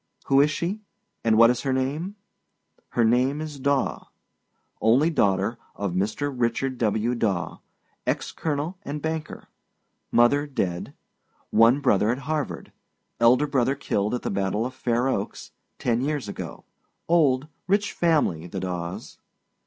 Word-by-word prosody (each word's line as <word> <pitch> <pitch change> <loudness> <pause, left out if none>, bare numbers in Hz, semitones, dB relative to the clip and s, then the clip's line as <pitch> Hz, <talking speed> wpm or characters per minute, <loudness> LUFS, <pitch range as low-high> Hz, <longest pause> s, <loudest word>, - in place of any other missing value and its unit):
Who 135 0 +5
is 145 - +4
she, 180 +7 -2 0.4
and 110 -1 +3
what 115 +1 +8
is 125 - -2
her 135 - -1
name? 145 +9 -1 0.7
Her 120 - +2
name 125 +5 +2
is 155 -2 -6
Daw. 140 0 0 0.7
Only 130 +9 +4
daughter 105 - +1 0.2
if 100 -2 -2
Mr. 105 +10 -1
Richard 125 +2 -1
W. 110 +1 +1
Daw, 100 -8 -1 0.5
ex - - -1
colonel 160 +4 -3
and 150 -5 -5
banker. 160 0 -4 0.6
Mother 140 +5 +4
dead. 90 -11 -3 0.6
One 115 +5 +5
brother 105 -5 +3
at 120 - +1
Harvard, 155 -3 -3 0.5
elder 125 +5 +5
brother 135 -2 +1
killed 105 -5 -1
at 125 - -5
the - - -2
battle 100 +3 0
of 130 - -4
Fair 125 -1 0
Oaks, 100 -6 -3 0.3
ten 120 0 0
years 145 -4 -2
ago. 100 - -7 0.4
Old, 150 -5 +3 0.2
rich 200 +2 +1
family, 145 - +1
the - - -5
Daws. 90 -2 -5
130 Hz, 140 wpm, -25 LUFS, 110-145 Hz, 0.7 s, what